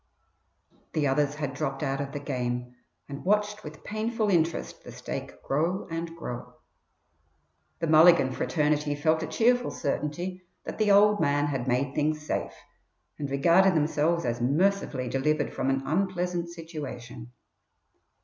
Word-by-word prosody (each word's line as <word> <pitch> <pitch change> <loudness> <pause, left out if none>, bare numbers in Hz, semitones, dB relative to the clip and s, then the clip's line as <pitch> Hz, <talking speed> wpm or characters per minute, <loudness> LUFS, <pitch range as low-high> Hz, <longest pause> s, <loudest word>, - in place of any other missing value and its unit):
The 155 -2 +1
others 145 +1 +1
had 145 -3 -3
dropped 140 0 -3
out 135 -1 -1
of 140 -1 -5
the 145 - -4
game 125 -3 -3 0.3
and 140 0 -7
watched 210 +2 +1
with 150 0 -10
painful 215 0 -1
interest 165 -2 0
the - - -10
stake - - -7
grow 165 +7 -1
and 165 0 -4
grow. 125 -7 -7 1.2
The 165 - -2
Mulligan 160 -3 +6
fraternity 150 +1 0
felt 155 +2 +1
a 160 - -3
cheerful 245 +7 +2
certainty 175 +6 -3 0.2
that - - -7
the 215 -1 +3
"old 205 +1 +6
man" 145 +1 +2
had 135 -4 -2
made 130 +2 0
things 150 +1 -1
safe, - - -3 0.6
and 145 -2 -3
regarded 170 +7 +4
themselves 160 +2 +1
as 120 0 -2
mercifully 145 -1 +1
delivered 145 +4 0
from 130 - -1
an 135 0 0
unpleasant 180 +1 -1
situation. 150 -8 -8
155 Hz, 140 wpm, -27 LUFS, 140-175 Hz, 1.2 s, Mulligan